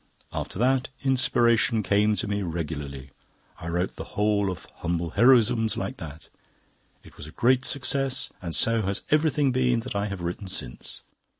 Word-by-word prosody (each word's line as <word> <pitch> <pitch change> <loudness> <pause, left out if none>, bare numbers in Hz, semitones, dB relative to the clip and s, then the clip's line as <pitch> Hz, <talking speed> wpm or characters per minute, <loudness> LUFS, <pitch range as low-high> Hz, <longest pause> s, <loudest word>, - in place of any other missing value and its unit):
After - - -4
that, 130 +3 +2
Inspiration 120 -4 +2
came 105 +2 +2
to 115 - -3
me 100 0 -1
regularly. 75 -6 -5 0.5
I 85 - -7
wrote 90 +3 -2
the - - -5
whole 105 -1 +2
of 90 - -6
'Humble 85 -1 -2
Heroisms' 115 -3 +4
like 130 - -4
that. 80 0 -9 0.8
It - - -17
was 75 - -9
a - - -10
great 130 +6 +2
success, 135 -1 0
and 85 -3 -2
so 115 0 +3
has 100 0 -2
everything 150 -2 +3
been 125 -2 +2
that 120 -2 -7
I 100 +1 0
have 100 -3 -5
written 90 +3 -4
since." 60 -9 -5
105 Hz, 165 wpm, -26 LUFS, 85-125 Hz, 0.8 s, Heroisms